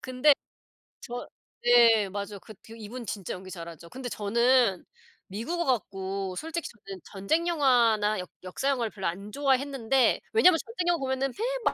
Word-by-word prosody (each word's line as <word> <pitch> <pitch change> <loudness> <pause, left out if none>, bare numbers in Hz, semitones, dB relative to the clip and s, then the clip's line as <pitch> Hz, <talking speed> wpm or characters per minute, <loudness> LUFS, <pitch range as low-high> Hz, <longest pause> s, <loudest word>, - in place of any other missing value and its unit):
근데 255 +4 +4 0.7
저 245 +1 -6 0.4
네 230 -4 +6
맞아요. 200 +1 -5
그 220 - -12
그리고 225 - -12
이분 235 +3 -7
진짜 195 -3 -4
연기 185 0 -9
잘하죠. 170 -2 -9
근데 255 +3 -7
저는 235 -1 +2 0.4
미국 235 - -4
와 - - 0
갖고 195 - -2
솔직히 325 - -4
저는 195 -5 -11
전쟁 265 - -1
영화나 235 - +3
역 180 - -6
역사 185 +9 -2
영화를 240 -5 0
별로 195 -3 -4
안 200 +5 -5
좋아했는데 270 -2 +2
왜냐하면 365 -7 +6
전쟁영화 350 -7 -1
보면은 265 0 -1 0.4
매 - - +3
235 Hz, 330 characters per minute, -28 LUFS, 200-270 Hz, 0.7 s, 네